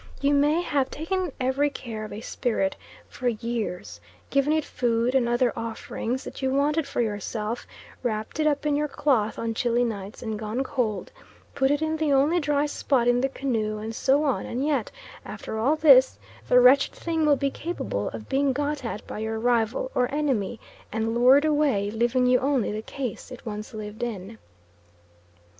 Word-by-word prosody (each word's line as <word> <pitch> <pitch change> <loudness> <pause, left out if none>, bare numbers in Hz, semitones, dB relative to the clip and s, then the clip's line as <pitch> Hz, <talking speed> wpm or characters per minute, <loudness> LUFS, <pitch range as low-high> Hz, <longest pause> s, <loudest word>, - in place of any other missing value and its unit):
You 280 +1 +2
may 295 +4 +3
have 280 -5 0
taken 360 +2 -2
every 265 +3 +1
care 225 -6 -6
of 215 - -7
a 210 - -6
spirit 220 -5 -1 0.3
for 255 - -4
years, 220 - -3 0.3
given 275 +2 +2
it 310 -1 +1
food 240 0 0
and 250 -3 +2
other 240 0 +2
offerings 230 +2 -4
that - - -8
you 265 - +1
wanted 290 +2 +1
for 280 - -1
yourself, 215 +1 -3 0.3
wrapped 220 +2 -3
it 310 - +3
up 295 0 0
in 295 -1 +2
your 300 +1 0
cloth 265 -7 +1
on 230 0 -2
chilly 240 +1 +1
nights 205 -3 -5
and 220 -2 -3
gone 220 +4 -2
cold, 240 -8 -2 0.4
put 265 -1 +2
it 290 +2 +1
in 315 0 0
the 310 -2 +1
only 285 +6 +4
dry 295 -1 +1
spot 270 -4 +1
in 245 0 +3
the 270 - +1
canoe, 225 -6 -2
and 220 +2 -5
so 275 +5 +2
on, 275 -4 0
and 255 +4 -2
yet 285 -7 0 0.3
after 220 - -6
all 270 +8 +3
this, 275 -5 +6 0.3
the 250 - +6
wretched 260 +3 +6
thing 325 -2 -1
will 300 -1 +5
be 275 0 0
capable 310 - -3
of 110 -1 -8
being 275 0 +1
got 290 +1 -2
at 225 -2 -5
by - - -6
your 220 0 -2
rival 235 +2 +1
or 250 0 +1
enemy 260 -8 -1 0.3
and 225 +1 -1
lured 255 +5 +5
away, 285 -10 +2
leaving 240 +3 +1
you 250 0 +4
only 270 -5 +1
the 215 +1 -3
case 250 -1 -6
it 255 -1 -11
once 215 -1 -6
lived 215 +1 -7
in. 220 -2 -5
250 Hz, 185 wpm, -25 LUFS, 225-285 Hz, 0.4 s, this